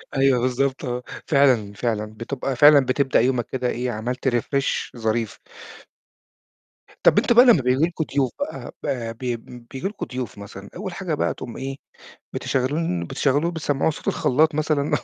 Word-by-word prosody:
أيوه، 135 -2 +4
بالضبط 130 +2 0
آه. 125 0 -3 0.2
فعلًا، 130 -9 +3
فعلًا 110 -1 -2
بتبقى 130 +4 -4
فعلًا 145 +1 +7
بتبدأ 135 +1 +2
يومك 125 -1 +1
كده 125 -1 -2
إيه، 125 +1 -2
عملت 120 +4 -3
refresh 130 +1 -1
ظريف. 110 -1 -1 1.6
طَب - - +5
أنت - - +4
بقى 245 +2 +8
لمّا 230 - +6
بييجي 130 +3 +2
لكم 170 -1 -3
ضيوف 135 -3 +1
بقى 285 +2 -5
ب - - -3 0.3
بي 125 -2 -2
بيبجي 125 +6 -7
لكم 205 +1 -5
ضيوف 125 -4 -6
مثلًا، 100 0 -10
أول 190 0 -5
حاجة 175 -2 -3
بقى 145 - 0
تقوم 120 - -8
إيه، 135 +1 -4 0.6
بتشغلون 130 - -1
بتشغّلوه 145 - +1
بتسمّعوه 155 -3 0
صوت 150 - -6
الخلّاط 155 +4 +2
مثلًا 155 -1 0
130 Hz, 155 wpm, -23 LUFS, 120-150 Hz, 1.6 s, بقى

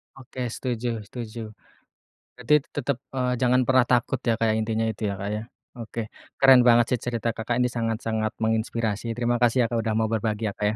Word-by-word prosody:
Oke, 130 -1 -9
setuju 120 -3 -3
setuju. 120 -2 -7 1.0
Berarti 125 +4 0
t - - -29
tetep, 140 -2 -1 0.2
eee, 125 -1 0
jangan 125 0 +4
pernah 130 -1 +4
takut 125 +1 +2
ya, 115 - +3
Kak, 115 -1 +2
intinya 110 0 -1
itu 110 - -7
ya, 100 - -3
Kak, 100 - -3
ya. 105 - -4 0.3
Oke, 115 -1 -6 0.4
keren 135 -2 +7
banget 120 0 +6
sih 125 - +1
cerita 115 -1 -1
Kakak 115 +1 -2
ini 125 0 +2
sangat-sangat 110 -1 -1
menginspirasi. 110 0 -1
Terima 120 0 +1
kasih 120 +1 +4
ya, - - 0
Kak, 115 - 0
udah 110 0 -1
mau 110 - +2
berbagi 110 0 -1
ya, - - -7
Kak, 105 +1 -1
ya. 105 - -2
115 Hz, 200 wpm, -25 LUFS, 110-125 Hz, 1.0 s, keren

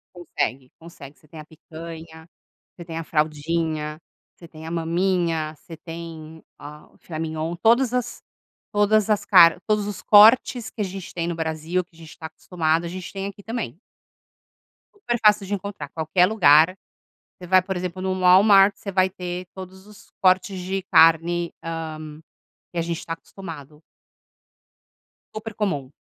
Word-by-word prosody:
Consegue, 135 -6 -4
consegue. 150 -4 -13
Você - - -24
tem 155 +1 -11
a - - -11
picanha, 160 +1 -11 0.5
você 175 - -11
tem 165 -1 -6
a 165 - -5
fraldinha, 155 0 -2 0.4
você 170 - -14
tem 160 -1 -12
a - - -6
maminha, 170 -1 -1
você 165 +2 -12
tem, 160 -1 -10 0.2
ah, 150 +1 -12
o - - -26
filé 160 -3 -8
mignon. 160 +1 -4
Todas 235 +5 +3
as 250 -1 -3 0.5
todas 210 +1 +2
as 205 -1 +1
car 175 -3 +6
todos 210 -1 0
os 205 -1 -6
cortes 225 +3 +5
que - - -11
a - - +1
gente 190 -1 -8
tem 170 -1 -2
no 170 - -2
Brasil, 160 +2 -2
que 170 - -34
a - - -20
gente 160 -1 -13
tá 160 - -7
acostumado, 160 0 -2
a - - -4
gente 185 +1 -8
tem 195 0 -5
aqui 200 0 -9
também. 220 - -5 1.2
Super 240 - -3
fácil 210 -1 +4
de 205 - -2
encontrar. 200 -7 -6
Qualquer 160 +3 +1
lugar, 180 -4 +5 0.6
você 180 - -10
vai, 185 +1 +5
por 190 +1 -5
exemplo, 180 +1 -5
no 185 0 -2
Walmart, 195 +2 +6
você 200 - -7
vai 185 0 +2
ter 180 -1 -6
todos 190 +1 -11
os 210 -1 -17
cortes 185 +1 +2
de 190 +2 -3
carne, 165 +1 +4
hã, 155 -2 -6 0.5
que 175 - -5
a - - +1
gente 170 0 -4
tá 165 - -4
acostumado. 160 -4 -10 1.5
Super 215 0 -7
comum. 150 -11 -3
170 Hz, 165 wpm, -23 LUFS, 160-195 Hz, 1.5 s, car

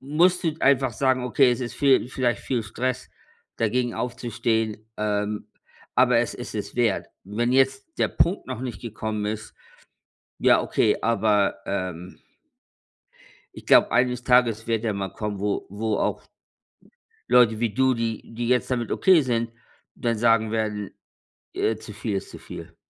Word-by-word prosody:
musst 175 +7 +2
du 160 -2 +1
einfach 135 -2 +3
sagen: 130 +2 +1
„Okay, 125 +1 +4
es 120 - -1
ist 120 -2 -4
viel 135 -4 +3
vielleicht 120 -2 -1
viel 125 -3 -1
Stress 130 +4 -3 0.5
dagegen 120 +2 0
aufzustehen, 115 -3 -2
ähm, 105 0 -2 0.5
aber 125 -1 +4
es 120 - -1
ist 120 - -8
es 105 - -5
wert.“ 115 -5 +1 0.2
Wenn 115 +5 -1
jetzt 135 - +1
der - - +2
Punkt 185 +4 +1
noch 130 -3 -5
nicht 125 -2 -5
gekommen 110 -2 -4
ist, 105 0 -5 0.9
ja, - - +5
okay, - - +1
aber, 105 -3 +2
ähm 90 -2 -4 1.4
ich - - -12
glaube, - - +5
eines 125 0 +1
Tages 120 -3 +3
wird 115 -1 -1
er 110 - +1
mal 100 -1 -4
kommen, 105 0 -4
wo 100 +1 -1
wo 105 +2 -2
auch - - -1 1.1
Leute 115 -3 +5
wie 115 0 0
du, 130 +2 +2
die 115 -1 -4
die 120 +1 -3
jetzt 125 +1 +1
damit 120 -3 -1
okay 185 -5 +5
sind, 115 -3 -1 0.4
dann 115 -2 -1
sagen 115 -1 +3
werden, 105 -2 -2 0.6
äh, 110 - 0
zu 110 - -11
viel 105 0 -3
ist - - -7
zu - - -10
viel. - - -10
115 Hz, 155 wpm, -24 LUFS, 105-125 Hz, 1.4 s, ja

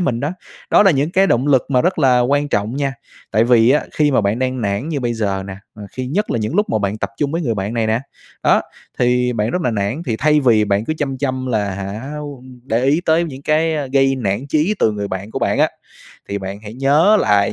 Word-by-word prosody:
mình 125 -9 0
đó. 145 - -1 0.4
Đó - - +6
là 195 - +5
những 150 +1 0
cái 190 +2 +3
động 125 -4 +1
lực 135 -3 +4
mà 130 -3 +2
rất 180 -1 0
là 130 -4 +4
quan 145 +4 +1
trọng 105 +3 -1
nha. 140 -2 -1 0.4
Tại 110 +1 +3
vì 120 0 +4
á, 150 - +2
khi 150 -1 +2
mà 130 - +3
bạn 100 +3 0
đang 130 -1 -1
nản 100 +7 -2
như 150 -4 -2
bây 120 -2 -1
giờ 100 -4 -2
nè, 95 - -6 0.2
ừ, 105 - -11
khi 130 0 -5
nhất 195 +11 -1
là - - 0
những 110 +6 -3
lúc 210 +1 +2
mà 110 - +1
bạn 100 +1 -2
tập - - -3
chung 145 +2 -1
với 165 - -1
người 120 -7 -1
bạn 105 +3 -3
này 115 -1 0
nè, 110 +2 +1 0.4
đó, - - +4 0.4
thì 125 0 +2
bạn 110 0 -1
rất 180 - -2
là 125 - +1
nản. 110 +8 -2
Thì 115 -3 -1
thay 150 +4 +3
vì 115 -6 +4
bạn 100 +1 0
cứ 155 - -1
chăm 135 -3 -2
chăm 130 -1 -2
là, 105 -5 0
hả, 105 +8 -6 0.5
để 120 -1 0
ý 145 +5 +3
tới 165 +2 +3
những 135 -4 -8
cái, 160 +2 +1
a, 145 -2 -2
gây 135 0 +2
nản 110 +2 -2
chí 160 +9 +1
từ 110 - +2
người 100 -1 -4
bạn 95 +3 -5
của - - -3
bạn - - 0
á, - - +4 0.6
thì 100 - -2
bạn 95 +1 -6
hãy 110 +1 -10
nhớ 145 +10 +4
lại 100 -1 +2
125 Hz, 260 wpm, -18 LUFS, 110-145 Hz, 0.6 s, Đó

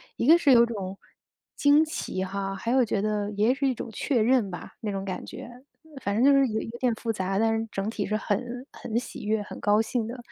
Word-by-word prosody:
一 - - -2
个 330 +2 +8
是 285 -5 +3
有 235 0 +7
种 195 -4 -5 0.6
惊 290 +2 +5
奇 250 -11 -3
哈， 195 0 -3
还 230 +5 -3
有 255 -2 +4
觉 210 -2 -1
得 210 -1 -1
也 210 +5 +2
是 275 0 0
一 260 - +2
种 230 - -6
确 240 +1 0
认 235 -3 +3
吧， 175 -3 -9
那 215 -3 -3
种 195 0 -3
感 190 -1 -5
觉。 - - -9 0.5
反 200 0 -1
正 230 - +2
就 280 - +7
是 275 -1 +5
有 220 -1 -2
有 230 +1 -7
点 250 -2 +2
复 230 +1 -2
杂， 195 -2 -2
但 225 +1 +2
是 225 - -4
整 195 +2 -2
体 215 -2 -3
是 215 - -1
很 245 +5 -3
很 225 0 -4
喜 240 - -5
悦、 215 0 +1
很 - - -9
高 210 +1 +3
兴 225 0 -2
的。 240 +3 -6
225 Hz, 260 characters per minute, -26 LUFS, 205-245 Hz, 0.6 s, 个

